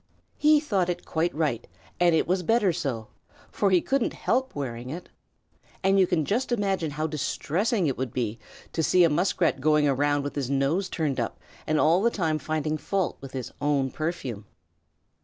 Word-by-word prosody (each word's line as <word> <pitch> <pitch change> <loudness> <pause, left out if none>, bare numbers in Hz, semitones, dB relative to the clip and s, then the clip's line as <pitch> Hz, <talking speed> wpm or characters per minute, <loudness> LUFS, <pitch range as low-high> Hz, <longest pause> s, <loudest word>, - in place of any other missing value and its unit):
He 300 0 +6
thought 200 - 0
it 175 - -3
quite 165 +2 0
right, 145 -7 -1 0.3
and 175 -2 +4
it - - +1
was 185 +1 +1
better 205 -1 +2
so, 135 -10 -3 0.4
for 200 - +1
he 185 -2 +4
couldn't 270 -3 0
help 260 +2 -1
wearing 125 -3 -4
it, 170 +6 -7 0.7
and 195 +1 +4
you 185 - +5
can 160 -4 +1
just 245 - -1
imagine 195 -8 0
how 150 +2 -3
distressing 170 - -1
it 135 -4 -1
would 130 -3 -2
be 115 -3 -2 0.3
to 165 - 0
see 180 +3 +4
a 165 - +4
Muskrat 170 -4 +1
going 150 0 +3
around 145 +1 +1
with 145 - -4
his 135 -3 -3
nose 140 +8 +1
turned 150 -7 -1
up 115 - -3 0.3
and 155 -1 +2
all 165 +4 +4
the 235 - +4
time 160 -8 -1
finding 155 0 -2
fault 190 +4 -1
with 135 -1 -9
his 130 -3 -5
own 140 -2 +1
perfume. 145 - -4
155 Hz, 185 wpm, -26 LUFS, 140-185 Hz, 0.7 s, He